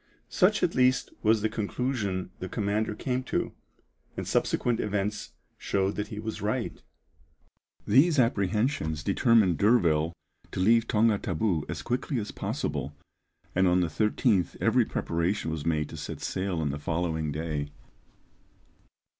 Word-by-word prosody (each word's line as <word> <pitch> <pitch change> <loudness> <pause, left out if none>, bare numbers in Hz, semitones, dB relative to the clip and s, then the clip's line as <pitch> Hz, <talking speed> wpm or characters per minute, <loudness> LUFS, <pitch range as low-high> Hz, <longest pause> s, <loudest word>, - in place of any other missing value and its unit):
Such - - +3
at - - +2
least 125 0 +2
was 110 -1 +3
the - - +4
conclusion 105 -4 -2
the 95 - -5
commander 105 +1 -1
came 130 +1 -2
to, - - -1 0.7
and - - -4
subsequent 120 -2 +1
events 105 0 -2 0.3
showed 95 0 0
that 105 0 -3
he 105 - -8
was 110 +1 -5
right. 110 +4 -2 1.0
These 150 +9 +4
apprehensions 105 - +1
determined 100 -2 +3
D'Urville 85 -8 +3 0.4
to - - -3
leave 115 +4 +4
Tonga 110 -2 +3
Tabou 90 -3 -1
as - - -4
quickly 125 +3 -2
as 105 - -5
possible, 75 +2 -3 0.6
and 95 +1 +3
on 90 +1 +3
the 85 - 0
13th 105 - +1
every - - +3
preparation 85 +1 -1
was 80 -1 -4
made 75 -2 +1
to - - -8
set - - -6
sail 95 -3 -2
on 75 -2 0
the 70 - -5
following 80 0 -1
day. 75 -1 -3
100 Hz, 140 wpm, -28 LUFS, 85-110 Hz, 1.0 s, the